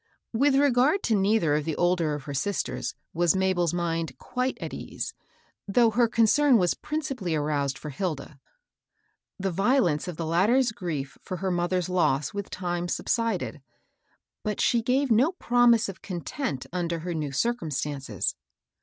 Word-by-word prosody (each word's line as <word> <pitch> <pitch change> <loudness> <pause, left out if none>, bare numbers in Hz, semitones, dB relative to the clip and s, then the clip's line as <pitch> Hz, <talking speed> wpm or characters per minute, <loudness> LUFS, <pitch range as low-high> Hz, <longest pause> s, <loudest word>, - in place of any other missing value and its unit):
With 270 +4 +3
regard 280 +5 +3
to 225 - +2
neither 195 -5 +2
of 150 0 +1
the 160 0 -2
older 175 -4 +1
of 145 - -7
her 140 - -6
sis 190 +9 0
ters - - -5 0.2
was 175 +1 +3
Mabel's 185 -3 +1
mind 165 -4 -2
quite 255 +1 -2
at - - -6
ease, 450 - -5 0.5
though 230 +3 +4
her 235 +2 +3
concern 235 +4 +4
was 180 -4 +2
principally 270 - -3
aroused 145 -2 -1
for 150 - -7
Hilda. 150 -3 -4 1.0
The 195 0 -1
violence 195 - +2
of 175 -3 -5
the 165 - -3
latter's 215 +10 +3
grief 165 - -5
for 185 - -5
her 190 +1 -1
mother's 175 +1 0
loss 155 -4 +1
with 200 -1 -4
time 175 -1 -3
subsided, 195 -5 -1 0.8
but 210 -1 -2
she 235 - +3
gave 255 +3 +1
no 260 - +4
promise 240 - +3
of 195 - -8
content 175 - -4
under 170 -2 -2
her 175 +1 -3
new 150 -3 -3
circumstances. 145 - -1
185 Hz, 155 wpm, -27 LUFS, 160-235 Hz, 1.0 s, though